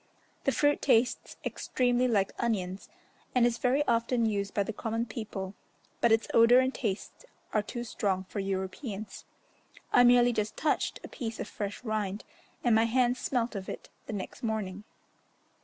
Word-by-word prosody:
The 275 Hz, -, +4 dB
fruit 290 Hz, +1 st, +2 dB
tastes 250 Hz, -1 st, +2 dB
extremely 250 Hz, 0 st, +1 dB
like 200 Hz, -5 st, +2 dB
onions, 195 Hz, -5 st, -2 dB, 0.5 s
and 245 Hz, -1 st, +5 dB
is 240 Hz, -1 st, +1 dB
very 270 Hz, +4 st, +2 dB
often 235 Hz, 0 st, +2 dB
used 200 Hz, -2 st, -1 dB
by 200 Hz, -, +1 dB
the 220 Hz, -, -4 dB
common 225 Hz, +2 st, -2 dB
people, 215 Hz, -4 st, -5 dB, 0.5 s
but 235 Hz, -, +3 dB
its 225 Hz, 0 st, +3 dB
odour 230 Hz, +2 st, +7 dB
and 260 Hz, +1 st, +3 dB
taste 210 Hz, -, -4 dB, 0.3 s
are 215 Hz, -, +3 dB
too 240 Hz, +3 st, -5 dB
strong 195 Hz, -5 st, -1 dB
for 195 Hz, +2 st, -6 dB
Europeans. 195 Hz, +2 st, -4 dB, 0.7 s
I 245 Hz, -, +7 dB
merely 245 Hz, 0 st, +6 dB
just 215 Hz, -1 st, -2 dB
touched 305 Hz, -, 0 dB
a -, -, -6 dB
piece 230 Hz, -5 st, -5 dB
of -, -, -3 dB
fresh 205 Hz, +3 st, -5 dB
rind, 215 Hz, -3 st, -2 dB, 0.4 s
and 240 Hz, -, +4 dB
my 220 Hz, +1 st, +5 dB
hands 245 Hz, +1 st, +2 dB
smelt 240 Hz, -2 st, -1 dB
of 195 Hz, -3 st, -5 dB
it -, -, -7 dB, 0.2 s
the -, -, -4 dB
next 195 Hz, -2 st, -6 dB
morning. 210 Hz, -3 st, -3 dB
225 Hz, 165 wpm, -30 LUFS, 205-245 Hz, 0.7 s, odour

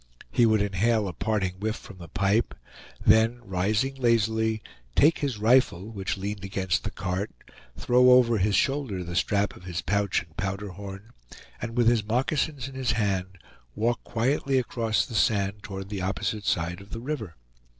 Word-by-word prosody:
He 120 Hz, -, +4 dB
would 110 Hz, -2 st, +3 dB
inhale 105 Hz, +2 st, +1 dB
a 90 Hz, -, -4 dB
parting 95 Hz, -1 st, -1 dB
whiff 110 Hz, +2 st, -1 dB
from 100 Hz, -6 st, -12 dB
the 85 Hz, -, -9 dB
pipe, 100 Hz, +4 st, +1 dB, 0.5 s
then 110 Hz, +3 st, +5 dB
rising 105 Hz, +8 st, 0 dB
lazily, 110 Hz, -2 st, +1 dB, 0.3 s
take 155 Hz, +3 st, +5 dB
his 135 Hz, -6 st, -2 dB
rifle, 110 Hz, -3 st, +3 dB
which 100 Hz, -1 st, -3 dB
leaned 100 Hz, 0 st, -4 dB
against 95 Hz, -2 st, -1 dB
the -, -, -2 dB
cart, 90 Hz, +4 st, -3 dB, 0.5 s
throw 125 Hz, -, +4 dB
over 120 Hz, -3 st, +5 dB
his 100 Hz, +1 st, +2 dB
shoulder 130 Hz, -7 st, 0 dB
the 85 Hz, 0 st, -6 dB
strap 100 Hz, +2 st, +1 dB
of 90 Hz, -, -14 dB
his 85 Hz, -2 st, -4 dB
pouch 100 Hz, +1 st, +1 dB
and 80 Hz, -2 st, -24 dB
powder 100 Hz, 0 st, -3 dB
horn, 100 Hz, +3 st, -9 dB, 0.5 s
and 115 Hz, 0 st, -5 dB
with 120 Hz, -2 st, +4 dB
his 115 Hz, -2 st, +4 dB
moccasins 135 Hz, +4 st, -1 dB
in 135 Hz, -, -9 dB
his 130 Hz, -3 st, 0 dB
hand 95 Hz, -3 st, -1 dB, 0.4 s
walk 120 Hz, +2 st, 0 dB
quietly 135 Hz, +3 st, 0 dB
across 115 Hz, -3 st, 0 dB
the -, -, -10 dB
sand 105 Hz, -1 st, +1 dB
toward 95 Hz, -1 st, -7 dB
the 100 Hz, -2 st, -4 dB
opposite 100 Hz, +2 st, -2 dB
side 85 Hz, +2 st, -1 dB
of 100 Hz, -, -14 dB
the 115 Hz, -, -5 dB
river. 115 Hz, -, -5 dB
105 Hz, 170 wpm, -26 LUFS, 95-120 Hz, 0.5 s, then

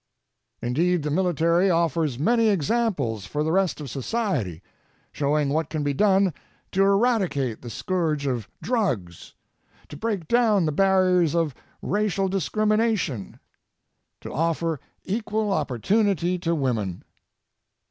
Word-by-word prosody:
Indeed, 165 Hz, +7 st, +1 dB
the 150 Hz, -, -2 dB
military 175 Hz, +1 st, +2 dB
offers 165 Hz, -5 st, +1 dB
many 230 Hz, -, +3 dB
examples 160 Hz, -, 0 dB
for 150 Hz, +6 st, -2 dB
the 160 Hz, -, 0 dB
rest 190 Hz, -1 st, +1 dB
of 150 Hz, -, -6 dB
society, 130 Hz, -, -2 dB, 0.5 s
showing 145 Hz, 0 st, 0 dB
what 155 Hz, +2 st, 0 dB
can 155 Hz, -2 st, -2 dB
be 145 Hz, -1 st, 0 dB
done 195 Hz, +1 st, +3 dB, 0.4 s
to 195 Hz, -, +1 dB
eradicate 195 Hz, -, +2 dB
the 120 Hz, -, -8 dB
scourge 160 Hz, -1 st, -1 dB
of 125 Hz, -6 st, -2 dB
drugs, 125 Hz, -, -2 dB, 0.5 s
to -, -, -8 dB
break 200 Hz, -3 st, -2 dB
down 220 Hz, -5 st, +3 dB
the 155 Hz, -, +1 dB
barriers 185 Hz, -2 st, +3 dB
of 165 Hz, -4 st, +1 dB, 0.3 s
racial 200 Hz, -1 st, 0 dB
discrimination, 210 Hz, -, 0 dB, 0.8 s
to -, -, -7 dB
offer 165 Hz, 0 st, 0 dB, 0.2 s
equal 215 Hz, 0 st, -1 dB
opportunity 180 Hz, -, +1 dB
to 170 Hz, -1 st, 0 dB
women. 115 Hz, -, -2 dB
170 Hz, 120 wpm, -24 LUFS, 145-200 Hz, 0.8 s, many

